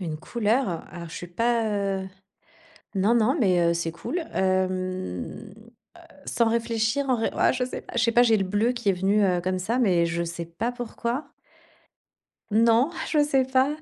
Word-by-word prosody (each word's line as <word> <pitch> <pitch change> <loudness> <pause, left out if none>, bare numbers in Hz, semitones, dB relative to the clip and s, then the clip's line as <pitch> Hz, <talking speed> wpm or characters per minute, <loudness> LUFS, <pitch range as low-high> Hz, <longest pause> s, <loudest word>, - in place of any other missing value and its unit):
Une 160 -4 -4
couleur? 220 -2 -1
Alors, 170 -1 -8
je 165 - -10
suis 175 - -6
pas, 230 +5 0 0.4
heu 190 - -7 0.9
Non, 200 +5 +3
non, 240 +5 +3
mais, 185 -6 +3
heu, - - +1
c'est 165 -1 -2
cool, 335 - -4 0.2
hem. 185 - -2
Heu, - - -15 0.7
sans 235 -1 +1
réfléchir, 230 +3 0
en 250 - +3
vrai 225 - -1
ah - - +3
je 250 0 -1
sais 255 - -6
pas! - - -13
Je 230 - +2
sais 230 0 +2
pas, 240 - +6
j'ai 230 -2 +4
le 195 - 0
bleu 210 +6 +1
qui 235 -4 -3
est - - +3
venu, 195 +3 +2
heu, 180 -2 +2
comme 185 0 -1
ça, 225 +7 -1
mais 180 -8 +3
je 170 0 -1
sais 170 0 -5
pas 220 +9 -3
pourquoi. 245 +2 -4 1.2
Non, 230 +6 +4 0.2
je 300 -2 +4
sais 270 -3 +2
pas. 260 +1 +2
220 Hz, 190 wpm, -25 LUFS, 185-240 Hz, 1.2 s, pas